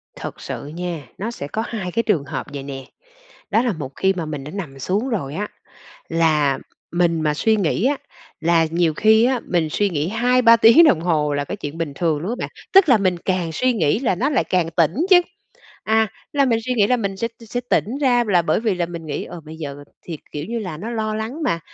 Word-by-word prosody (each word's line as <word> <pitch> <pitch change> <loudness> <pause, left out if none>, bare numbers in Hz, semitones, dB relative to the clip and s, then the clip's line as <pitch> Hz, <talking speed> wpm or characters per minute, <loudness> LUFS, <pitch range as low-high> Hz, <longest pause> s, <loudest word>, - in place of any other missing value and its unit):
Thật - - -7
sự - - -6
nha, 165 -2 -5
nó 220 +4 -3
sẽ 140 - -6
có 220 +9 -3
2 190 -6 -4
cái 230 +5 0
trường 180 -10 +1
hợp - - -5
vậy 140 - -5
nè. 135 -1 -7 0.7
Đó 220 +3 +3
là 245 - +1
một 145 -6 -6
khi 190 0 +2
mà 175 -4 -4
mình 150 -3 -5
đã 150 - -7
nằm 155 -8 -6
xuống 200 - -1
rồi 160 - -3
á 205 +4 -3 0.6
là 155 -4 +2 0.3
mình 170 -1 +2
mà 150 -1 +1
suy 220 +7 +2
nghĩ 195 +2 0
á, 285 +2 +2 0.4
là 165 0 +3
nhiều 165 -1 +1
khi 220 +5 +5
á 250 -1 +2
mình 170 -3 +1
suy 205 +4 +1
nghĩ 150 0 -1
2-3 235 +2 +4
tiếng 230 +9 +7
đồng 190 - +4
hồ 155 -4 +1
là 145 - -1
cái 205 - -5
chuyện 155 -3 -7
bình 155 -4 -3
thường 160 -1 0
luôn 180 +7 -3
á 245 - -2
bạn, - - -3 0.2
tức 390 -4 +7
là 245 -5 +6
mình 185 -3 +1
càng 185 -3 0
suy 255 +10 +1
nghĩ 175 -5 +1
là 240 -6 +1
nó 245 +10 0
lại 275 - +1
càng 175 -3 0
tỉnh 165 0 +2 0.2
chứ. 365 -2 +8 0.6
À, 220 0 +3 0.2
là 280 -1 +3
mình 235 -4 +2
suy 250 - 0
nghĩ 210 -4 +4
là 250 - +2
mình 200 -4 -3
sẽ 230 +4 -2 0.2
sẽ 245 - -2
tỉnh 245 +7 +1
ra 245 -4 +3
là 180 -4 +4
bởi 160 +3 +1
vì 220 -3 +1
là 175 -1 -1
mình 170 -2 -8
nghĩ, 145 - -3
ờ, 175 - -9
bây 160 +1 -11
giờ 145 -3 -6 0.3
thì, 165 -3 -7
kiểu 150 0 -4
như 235 +1 -2
là, 185 -8 -5
nó 215 +9 -6
lo 215 -2 -2
lắng 225 +9 -4
mà, 170 - 0
180 Hz, 245 wpm, -21 LUFS, 160-225 Hz, 0.7 s, chứ